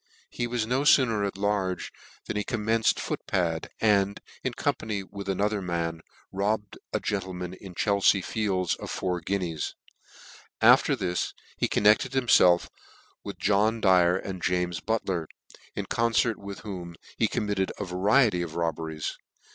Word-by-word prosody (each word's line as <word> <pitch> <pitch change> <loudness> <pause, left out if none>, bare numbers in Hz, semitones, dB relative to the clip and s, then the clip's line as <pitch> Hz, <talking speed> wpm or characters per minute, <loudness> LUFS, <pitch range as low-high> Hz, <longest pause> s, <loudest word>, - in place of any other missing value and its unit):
He 120 - -2
was 120 -2 -1
no 125 +4 +1
fooner 115 -8 +4
at 95 - -6
large 100 -2 -1 0.3
than - - -4
he 105 - 0
commenced 115 -1 +1
foot - - -3
pad, 85 -4 -1
and, 100 -2 +2 0.2
in - - -2
company 105 -3 -2
with 100 +1 -8
another 100 +2 0
man, 85 -2 -2 0.3
robbed 105 +1 -2
a - - 0
gentleman 90 -3 -3
in 95 -1 -11
Chelfea 100 -1 +3
Fields 95 -5 0
of - - -6
four 90 -2 -2
guineas: 85 -3 -2 0.8
after - - +6
this 90 0 -2 0.2
he - - 0
connected 105 +5 +3
himfelf 105 -9 +5 0.6
with - - -7
John 105 +3 +2
Dyer, 90 -3 +4
and 95 -1 -6
James 90 -2 0
Butler, 95 -5 -2 0.5
in - - -3
concert 115 -1 +1
with 100 0 -8
whom 90 -5 -7 0.2
he - - +4
committed 100 -2 -1
a 105 - -3
variety 100 +2 +3
of 85 -2 -5
robberies. 80 -2 -3
100 Hz, 145 wpm, -27 LUFS, 90-105 Hz, 0.8 s, after